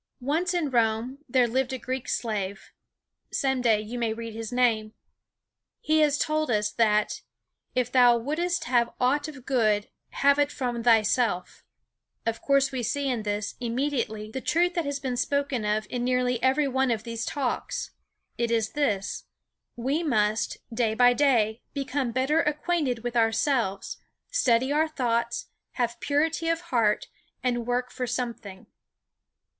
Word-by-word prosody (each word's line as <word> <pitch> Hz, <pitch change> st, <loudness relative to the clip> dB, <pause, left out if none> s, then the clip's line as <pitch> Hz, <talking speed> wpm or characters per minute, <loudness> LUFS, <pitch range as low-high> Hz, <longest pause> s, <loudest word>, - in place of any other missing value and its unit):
Once 335 Hz, +7 st, 0 dB
in 310 Hz, -6 st, 0 dB
Rome 235 Hz, +2 st, +1 dB
there 250 Hz, -1 st, +4 dB
lived 260 Hz, +2 st, 0 dB
a -, -, -2 dB
Greek 255 Hz, 0 st, -4 dB
slave 200 Hz, -4 st, -3 dB, 0.6 s
some 265 Hz, -2 st, 0 dB
day 225 Hz, -3 st, +3 dB
you 220 Hz, +3 st, -5 dB
may 230 Hz, -2 st, 0 dB
read 230 Hz, 0 st, -7 dB
his 225 Hz, 0 st, -6 dB
name. 225 Hz, -3 st, +1 dB, 0.8 s
He 310 Hz, 0 st, +2 dB
has 295 Hz, -2 st, +3 dB
told 310 Hz, -1 st, 0 dB
us, 210 Hz, -2 st, +1 dB
that 215 Hz, -2 st, +1 dB, 0.5 s
"if 250 Hz, -1 st, 0 dB
thou 245 Hz, -2 st, +6 dB
wouldst 330 Hz, +7 st, -1 dB
have 240 Hz, -6 st, +1 dB
aught 285 Hz, +4 st, +2 dB
of 275 Hz, -5 st, -10 dB
good, 215 Hz, -6 st, +1 dB, 0.2 s
have 280 Hz, +1 st, +3 dB
it 290 Hz, 0 st, +2 dB
from 245 Hz, -4 st, -3 dB
thyself." 225 Hz, -4 st, +2 dB, 0.6 s
Of 230 Hz, 0 st, -2 dB
course 275 Hz, -1 st, +3 dB
we 260 Hz, -2 st, -2 dB
see 280 Hz, +4 st, -1 dB
in 240 Hz, -3 st, -1 dB
this, 205 Hz, 0 st, -2 dB
immediately, 235 Hz, -3 st, -2 dB
the 265 Hz, -, -4 dB
truth 350 Hz, +5 st, +2 dB
that 340 Hz, -4 st, -1 dB
has 285 Hz, 0 st, -2 dB
been 255 Hz, -3 st, -3 dB
spoken 280 Hz, -4 st, 0 dB
of 210 Hz, +1 st, 0 dB
in 245 Hz, -1 st, -3 dB
nearly 250 Hz, -1 st, +1 dB
every 270 Hz, +3 st, +3 dB
one 265 Hz, 0 st, +1 dB
of 225 Hz, -2 st, -1 dB
these 230 Hz, -1 st, -4 dB
Talks. 265 Hz, -2 st, -3 dB, 0.5 s
It 235 Hz, -1 st, +1 dB
is 225 Hz, -2 st, +1 dB
this: 215 Hz, -10 st, -1 dB, 0.5 s
We 265 Hz, +6 st, -1 dB
must, 215 Hz, -8 st, +1 dB, 0.2 s
day 225 Hz, -2 st, +1 dB
by 245 Hz, +1 st, +6 dB
day, 235 Hz, -5 st, +2 dB
become 275 Hz, -2 st, -1 dB
better 265 Hz, +6 st, +2 dB
acquainted 295 Hz, -5 st, -1 dB
with 245 Hz, 0 st, -3 dB
ourselves, 225 Hz, -3 st, +1 dB, 0.3 s
study 260 Hz, -, +2 dB
our 310 Hz, +2 st, +3 dB
thoughts, 235 Hz, -5 st, -1 dB, 0.2 s
have 235 Hz, -2 st, -2 dB
purity 320 Hz, +3 st, 0 dB
of 330 Hz, 0 st, 0 dB
heart, 220 Hz, -3 st, +2 dB, 0.4 s
and 240 Hz, -2 st, -1 dB
work 250 Hz, 0 st, -1 dB
for 250 Hz, -, -3 dB
something. 230 Hz, -6 st, -4 dB
245 Hz, 155 wpm, -26 LUFS, 225-280 Hz, 0.8 s, thou